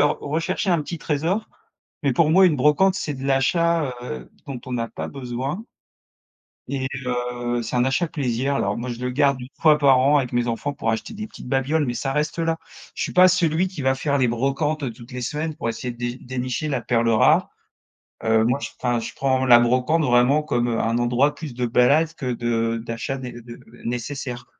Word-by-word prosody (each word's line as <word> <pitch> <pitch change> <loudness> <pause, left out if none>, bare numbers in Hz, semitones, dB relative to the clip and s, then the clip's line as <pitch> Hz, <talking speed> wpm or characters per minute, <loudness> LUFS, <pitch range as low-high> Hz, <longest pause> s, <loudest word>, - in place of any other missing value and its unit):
se 145 - +6
r - - -1
rechercher 165 +6 -1
un 170 -3 +2
petit 170 +3 -6
trésor, 165 +9 -1 0.5
mais 140 -3 +2
pour 155 +3 +3
moi 190 +3 +6
une 155 -4 +2
brocante, 150 +8 +4
c'est 150 -5 -3
de 135 +1 -7
l'achat, 150 +1 +2
heu, 65 - -7 0.2
dont 135 -3 -6
on 125 -2 -3
a 115 - -2
pas - - -6
besoin 135 - -4 1.0
et 135 -1 -2 0.2
heu, 120 -1 -2
c'est 115 +2 -3
un 125 - +3
achat 145 +6 +1
plaisir. 135 -2 -1
Alors 100 -6 0
moi 125 - -4
je 120 -1 -5
le 125 0 -2
garde 140 +1 +2
1 125 - -8
fois 155 -2 +6
par 135 -3 +5
an 140 +3 +4
avec 130 -4 0
mes 120 0 +1
enfants 120 +5 -2
pour 140 -6 -2
acheter 110 - -3
des 215 0 -6
petites 205 - -12
babioles, 140 +4 +1
mais 120 - -1
ça 135 +3 -2
reste 150 +2 -1
là. 165 0 +1 0.4
Je - - -3
suis - - -3
pas 185 +1 +7
celui 175 0 +2
qui 170 -6 -7
va 130 0 +2
faire 140 +2 0
les 130 -3 +2
brocantes, 140 +6 -1
heu, 130 - -1
toutes 120 +2 -14
les 125 - -5
semaines 150 +5 -3
pour 115 - -3
essayer 120 +2 -4
de 120 - -17
dé 120 0 -3
dénicher 130 +4 -3
la 135 -4 -1
perle 115 0 +1
rare, 110 - +4 0.8
heu, 110 0 +4
moi 125 +5 +1
je - - -4
enfin 120 -1 0
je - - -6
prends 130 -1 +1
la 120 -1 +8
brocante 125 +7 +2
vraiment 125 +3 +3
comme, 120 -5 0
heu, 115 -1 0
un 115 +1 0
endroit 125 +5 +2
plus 150 -5 -7
de 125 0 -2
balade 145 +7 +3
que 125 -3 -3
de 115 -1 -1
d'achat 115 +4 -3
né 125 -2 -7
heu, 120 0 -11 0.3
nécessaire. 125 +1 -4
130 Hz, 220 wpm, -23 LUFS, 120-150 Hz, 1.0 s, la